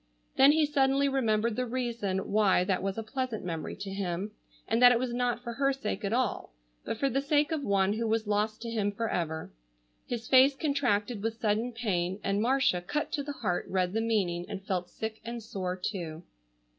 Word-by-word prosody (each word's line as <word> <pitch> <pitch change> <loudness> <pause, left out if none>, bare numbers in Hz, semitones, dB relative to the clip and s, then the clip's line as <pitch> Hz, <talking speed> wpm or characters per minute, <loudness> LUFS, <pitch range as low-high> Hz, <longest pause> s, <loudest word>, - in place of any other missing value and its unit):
Then 270 +2 +7
he 310 0 +4
suddenly 280 -1 +2
remembered 230 -4 +1
the 255 +1 -1
reason 230 -6 -2
why 200 -3 +4
that 185 -1 0
was 195 +1 -2
a 225 - -2
pleasant 255 -2 -3
memory 165 -3 -4
to 195 0 -6
him, 195 +1 -3 0.4
and 225 +2 +1
that 245 0 +9
it 245 - +4
was 245 0 -2
not 245 0 -1
for 235 -1 -4
her 275 +3 +2
sake 215 -6 -4
at 200 - -1
all, 235 - -1 0.3
but - - -3
for 275 - +1
the 270 +1 0
sake 290 +1 +2
of 310 -3 -1
one 200 -3 +2
who 230 +1 -1
was 220 0 +1
lost 210 +2 -1
to 230 - -4
him 205 -3 0
forever. 175 -7 -3 0.6
His 235 -2 -4
face 265 +1 +6
contracted 245 -7 0
with 225 +1 -3
sudden 220 +2 0
pain, 190 -5 -1
and 200 +1 0
Marcia, 250 -6 +2
cut 295 +12 -3
to 290 - -1
the 290 +1 -5
heart, 180 -4 0
read 185 -1 0
the 225 - +1
meaning, 190 -6 0
and 195 -1 -6
felt 180 -2 -2
sick 220 0 -6
and 235 0 -6
sore 185 -4 -3
too. 175 -4 -4
220 Hz, 205 wpm, -29 LUFS, 195-250 Hz, 0.6 s, that